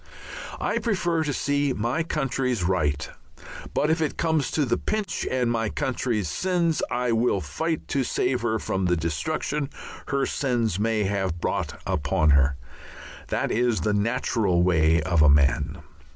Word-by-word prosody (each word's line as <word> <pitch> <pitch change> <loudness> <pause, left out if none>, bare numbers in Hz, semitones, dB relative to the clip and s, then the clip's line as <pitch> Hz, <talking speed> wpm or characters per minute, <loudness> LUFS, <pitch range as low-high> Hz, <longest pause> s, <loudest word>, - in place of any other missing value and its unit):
I - - 0
prefer 175 -7 0
to 145 - -1
see 145 0 0
my 120 +9 -1
country 135 -5 -1
right, 85 -7 0 0.7
but 150 - +2
if 160 0 +1
it 155 - -1
comes 160 -5 +1
to 150 - +1
the - - +1
pinch 215 -2 -2
and 125 -2 +1
my 115 -2 0
country 125 -6 -1
sins 170 - 0
I 125 -1 0
will 115 -3 +2
fight 160 - -3
to 135 - +1
save 125 0 0
her 110 -1 0
from 95 -3 -2
the 90 -1 +2
destruction 140 - -2 0.4
her 140 -1 +1
sins 120 -8 0
may 110 0 +1
have 95 -3 -1
brought - - -2
upon 75 +1 +1
her. 70 0 +4 0.7
That - - -1
is 120 0 +1
the 105 - +1
natural 105 -4 +1
way 80 -2 +3
of 85 -1 +2
a 75 - +7
man. 75 +3 +2
115 Hz, 155 wpm, -25 LUFS, 90-145 Hz, 0.7 s, a